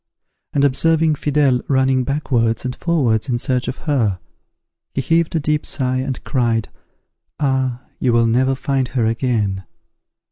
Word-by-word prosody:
and 140 - +1
observing 155 +3 +3
Fidele 145 -4 +1
running 130 -1 +2
backwards 125 -4 0
and 125 - -3
forwards 135 -8 0
in 120 - +1
search 125 0 -1
of 125 - -3
her, 115 - +1 0.8
he - - 0
heaved 165 +5 +1
a - - +3
deep 150 0 0
sigh, 130 -2 -2
and 130 -1 -4
cried, 115 -5 0 0.7
"Ah! 130 -3 0 0.2
you 125 - +2
will 115 0 +4
never 130 +4 +2
find 135 -1 -1
her 120 -2 0
again." 110 -5 0
130 Hz, 145 wpm, -19 LUFS, 120-140 Hz, 0.8 s, will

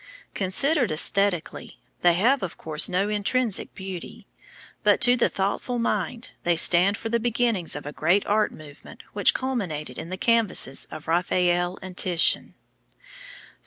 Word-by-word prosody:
Considered 245 - +1
æsthetically, 180 +2 -1 0.3
they 175 -1 +4
have 245 +9 +2
of 185 - -5
course 155 -1 +2
no 185 +2 0
intrinsic 210 +2 -1
beauty; 190 -2 -8 0.6
but 205 -2 +3
to 245 +1 +6
the 240 - +1
thoughtful 200 +5 -2
mind 235 +1 -2
they 175 0 +1
stand 180 +4 +4
for 225 - -5
the 235 +1 +1
beginnings 230 -6 0
of 145 - -7
a 145 - -5
great 175 +8 +1
art 210 +1 +1
movement 145 -2 -13
which - - +3
culminated 180 - -4
in 165 - -7
the 185 - -5
canvases 215 - +1
of 155 - -10
Raphael 175 +1 0
and 185 -1 -8
Titian. 175 -2 +1
190 Hz, 145 wpm, -24 LUFS, 175-230 Hz, 0.6 s, to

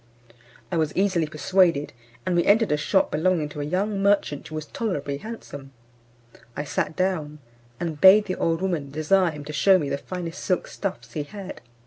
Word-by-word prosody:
I 175 - 0
was 155 -2 0
easily 185 -5 +2
persuaded, 160 -1 +2 0.3
and 180 - 0
we 170 - +3
entered 220 -1 +3
a - - +4
shop 190 +6 +1
belonging 160 -1 +1
to 150 0 -6
a - - -2
young 195 +6 -1
merchant 200 -8 +1
who 155 - -8
was 155 -1 -4
tolerably 145 - -3
handsome. 145 -11 -9 0.8
I 145 - -1
sat 150 - -2
down, 170 -5 -1 0.4
and 160 -4 -4
bade 200 +2 +8
the 185 - -2
old 165 0 -1
woman 165 -7 -1
desire 160 +6 +2
him 150 -2 -8
to 150 - -7
shew 190 +7 +5
me 145 -6 -2
the 140 - -2
finest 180 0 -6
silk 185 -2 0
stuffs 195 -2 -5
he 155 - -2
had. 195 +6 -8
170 Hz, 185 wpm, -24 LUFS, 150-190 Hz, 0.8 s, bade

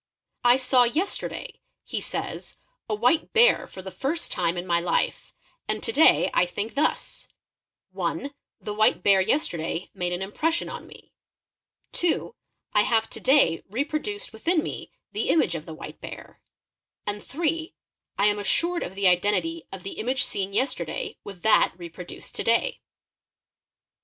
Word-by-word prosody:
| - - -56
"T 250 - +6
saw 255 -1 +4
yesterday," 315 +12 -2 0.2
he - - -4
says, - - -5 0.3
'a 215 - +1
white 245 +9 +2
bear 475 +2 +5
for 190 - -10
the 190 - -7
first 275 - -2
time 175 -1 0
in 175 - -3
my 170 -1 +2
4 175 - -2
hfe, - - -1 0.3
and - - -2
to - - -1
day 320 -7 +5
I - - +4
think 205 +5 -4
thus, 295 +3 0 0.6
(1) 280 +1 -3 0.3
the 210 - -5
white 215 +1 +3
bear 195 -1 +6
yesterday 175 - -1
made 180 0 -2
an 180 +2 -2
im 195 - -6
_ - - -25
pression 330 +2 +1
on - - -7
me; - - -16 0.8
(2) 350 +6 0 0.4
I 210 - +5
have 225 0 +1
to - - -4
day 260 - +4
reproduced 305 - -3
within 320 +8 +1
me - - -6 0.2
the - - -2
image 310 - +3
of 160 -2 -5
the 160 - -6
white - - -9
bear; - - -10 0.6
and 205 0 -3
(8) 320 +3 -2 0.4
I 200 - +3
am 210 0 +3
assured 340 - +2
of 190 - -5
the 195 -1 +2
identity 210 - +2
of 190 -2 -8
the 195 - -7
image 250 +4 +1
seen 195 -1 -1
Be 200 - -3
cstcrday 270 - -2
with 195 -3 -10
that 220 - +4
reproduced 175 0 -9
to - - -1
day. 235 - +2
220 Hz, 170 wpm, -26 LUFS, 190-310 Hz, 0.8 s, T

